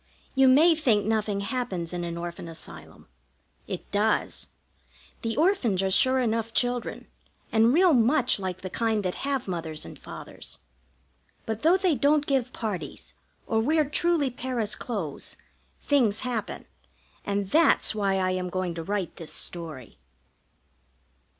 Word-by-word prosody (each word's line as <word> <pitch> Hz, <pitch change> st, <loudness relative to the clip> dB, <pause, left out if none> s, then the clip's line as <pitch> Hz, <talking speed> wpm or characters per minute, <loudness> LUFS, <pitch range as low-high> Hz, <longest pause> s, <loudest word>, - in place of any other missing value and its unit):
You 265 Hz, -1 st, +5 dB
may 305 Hz, +7 st, +7 dB
think 250 Hz, -10 st, +2 dB
nothing 215 Hz, -2 st, 0 dB
happens 200 Hz, -7 st, -3 dB
in 175 Hz, 0 st, -3 dB
an 170 Hz, 0 st, -4 dB
Orphan 170 Hz, 0 st, -6 dB
Asylum. 165 Hz, -1 st, -9 dB, 0.6 s
It -, -, -6 dB
does. 210 Hz, +1 st, 0 dB, 0.7 s
The 225 Hz, -1 st, -2 dB
orphans 290 Hz, -, +2 dB
are 190 Hz, -, 0 dB
sure 260 Hz, +6 st, +4 dB
enough 225 Hz, -2 st, -1 dB
children, 245 Hz, -1 st, -1 dB, 0.5 s
and 225 Hz, +1 st, +5 dB
real 350 Hz, +3 st, +5 dB
much 245 Hz, 0 st, +3 dB
like 185 Hz, -1 st, -4 dB
the 185 Hz, -, -5 dB
kind 225 Hz, -2 st, 0 dB
that 180 Hz, -, 0 dB
have 275 Hz, -4 st, -1 dB
Mothers 165 Hz, -4 st, -4 dB
and -, -, -10 dB
Fathers; -, -, -9 dB, 0.9 s
but 220 Hz, 0 st, -3 dB
though 335 Hz, +4 st, +5 dB
they 375 Hz, -3 st, +2 dB
don't 290 Hz, +3 st, +3 dB
give 265 Hz, -3 st, 0 dB
parties 160 Hz, -, -5 dB, 0.3 s
or 220 Hz, -, +1 dB
wear 305 Hz, +6 st, +2 dB
truly 310 Hz, -2 st, +1 dB
Paris 240 Hz, -4 st, -2 dB
clothes, 195 Hz, -, -4 dB, 0.5 s
things 235 Hz, -8 st, +2 dB
happen, 240 Hz, -4 st, -3 dB, 0.6 s
and 200 Hz, -1 st, -2 dB
that's 325 Hz, -6 st, +4 dB
why 200 Hz, -2 st, +1 dB
I 185 Hz, -1 st, +1 dB
am 185 Hz, 0 st, -2 dB
going 185 Hz, -1 st, -2 dB
to 165 Hz, -1 st, -5 dB
write 195 Hz, -1 st, -3 dB
this 165 Hz, -, -7 dB
story. 155 Hz, -, -6 dB
220 Hz, 145 wpm, -27 LUFS, 185-260 Hz, 0.9 s, may